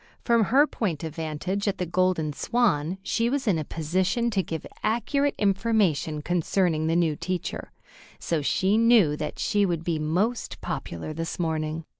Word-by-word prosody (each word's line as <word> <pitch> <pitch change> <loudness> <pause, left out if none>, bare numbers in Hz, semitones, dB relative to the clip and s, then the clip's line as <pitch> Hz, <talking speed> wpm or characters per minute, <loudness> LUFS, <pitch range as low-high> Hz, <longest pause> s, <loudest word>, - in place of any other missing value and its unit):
From 235 -3 +4
her 275 +8 +5
point 180 - -3
of 160 -2 -4
vantage 165 +6 -3
at 200 -1 0
the 180 - -2
Golden 175 -3 +1
Swan, 185 - +1
she 230 +3 0
was 275 +1 -1
in 180 -6 +3
a - - -2
position 185 +10 0
to 200 -3 +1
give 165 -3 -5 0.2
accurate 260 +6 0
information 195 -8 +1
concerning 170 -1 +1
the 165 - +1
new 165 -3 +2
teacher, 180 +2 -4 0.5
so 165 -3 -1
she 190 +8 +2
knew 230 -10 +5
that 150 0 -5
she 205 -1 +1
would 170 -4 0
be 165 -2 -1
most 185 +11 -1
popular 85 - -5
this 165 +1 -4
morning. 160 -1 -2
180 Hz, 165 wpm, -26 LUFS, 160-210 Hz, 0.5 s, her